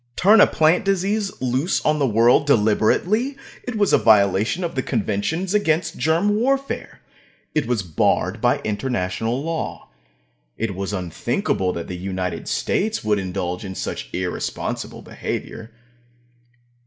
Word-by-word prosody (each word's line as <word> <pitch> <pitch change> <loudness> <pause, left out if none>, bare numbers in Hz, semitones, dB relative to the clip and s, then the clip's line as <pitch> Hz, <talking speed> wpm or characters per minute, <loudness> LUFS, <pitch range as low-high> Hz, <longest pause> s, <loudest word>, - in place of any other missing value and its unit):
Turn 210 +4 +6
a - - +8
plant 160 +6 +3
disease 195 +1 0
loose 130 +8 +1
on 150 0 +2
the 140 - +2
world 120 +5 +4
deliberately! 145 - +2 0.3
It 250 -3 -4
was 205 -2 +2
a - - +6
violation 105 - +3
of 170 - -3
the 130 - -1
conventions 130 - -1
against 170 -5 +1
germ 170 +6 +2
warfare. 270 +4 -1 0.5
It 150 -6 0
was 120 -5 0
barred 80 -4 0
by - - +2
international 110 +2 -2
law. 165 0 -4 0.7
It 115 -3 -2
was 95 +1 -4
unthinkable 90 0 -1
that 85 -1 -5
the 90 - -5
United 90 0 -4
States 215 +2 -1
would 105 -1 +1
indulge 90 -1 -3
in 95 -2 -6
such - - -5
irresponsible 90 -1 -4
behavior. 110 0 -6
125 Hz, 135 wpm, -22 LUFS, -, 0.7 s, a